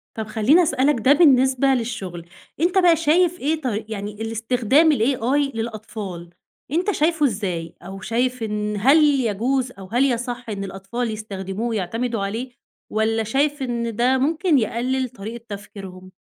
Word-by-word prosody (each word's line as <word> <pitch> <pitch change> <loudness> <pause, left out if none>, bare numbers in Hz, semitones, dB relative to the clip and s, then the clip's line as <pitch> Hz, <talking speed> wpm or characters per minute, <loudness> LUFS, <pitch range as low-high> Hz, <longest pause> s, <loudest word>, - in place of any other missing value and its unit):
طَب 220 -1 -4
خلّيني 230 +11 +4
أسألك 270 -2 +2
ده 260 +5 +5
بالنسبة 265 -4 +4
للشغل، 220 -9 -2 0.3
أنت 350 +4 +1
بقى 355 -3 +6
شايف 335 +3 +2
إيه 310 +3 -1
ط - - -11 0.2
يعني 210 -1 -5
الاستخدام 235 +7 +2
الAI 270 +2 +1
للأطفال، 215 -6 -6 0.4
أنت 355 +7 +1
شايفُه 320 -3 +1
إزاي، 185 - -3
أو 195 +2 -9
شايف 245 +3 -1
إن 210 -1 -2
هل 270 +9 +5
يجوز 260 -2 +1
أو 195 -4 -11
هل 245 +4 +3
يصَحّ 245 -1 -2
إن 200 -2 -4
الأطفال 195 +5 -4
يستخدموه 205 0 -5
ويعتمدوا 225 +1 -2
عليه، 225 +6 -4 0.4
والَّا 220 +1 +1
شايف 280 +6 0
إن 235 -3 -2
ده 250 +3 +3
ممكن 310 +3 +2
يقلّل 250 +3 -1
طريقة 230 +1 -8
تفكيرهم؟ 195 -2 -9
235 Hz, 145 wpm, -22 LUFS, 210-275 Hz, 0.4 s, بقى